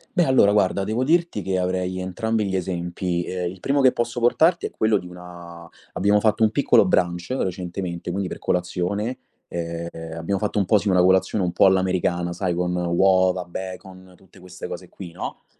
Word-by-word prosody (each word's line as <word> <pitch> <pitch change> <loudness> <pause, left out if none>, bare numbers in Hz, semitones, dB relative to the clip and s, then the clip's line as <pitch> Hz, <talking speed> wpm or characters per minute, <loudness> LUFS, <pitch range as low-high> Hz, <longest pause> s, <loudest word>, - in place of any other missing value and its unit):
Beh, 175 -2 +3
allora 130 -6 +4
guarda, 100 -1 +2
devo 110 +5 -1
dirti 170 -5 +1
che 95 -1 -2
avrei 90 0 -1
entrambi 105 +4 -1
gli 95 -1 -3
esempi. 90 -1 -2
Ehm, 90 -1 -3
il 95 0 -12
primo 140 +6 +1
che 130 -2 +5
posso 120 +1 -2
portarti 160 +8 +3
è - - -6
quello 110 -1 +1
di 90 - -10
una 85 -1 -11 0.3
abbiamo 100 +2 +3
fatto 110 +1 +1
un 110 - +5
piccolo 120 -2 +4
brunch 90 -2 0
recentemente, 90 -6 -3
quindi 95 +1 -2
per - - -7
colazione, 90 +6 -2 0.3
ehm, 85 0 -4 0.3
abbiamo 90 +4 -2
fatto 105 +1 -2
un 100 - +1
po', 105 - +4
sì, 100 0 +1
una 90 -1 +4
colazione 95 +2 +2
un 90 - -1
po' - - +3
all'americana, 90 -2 +1
sai, 90 0 -1
con 90 +1 -1
uova, 90 +1 +2
bacon, 95 +1 -8
tutte 95 +1 -21
queste 90 0 -9
cose - - -8
qui, 90 -3 -10
no, 90 - -7
95 Hz, 190 wpm, -23 LUFS, 90-105 Hz, 0.3 s, che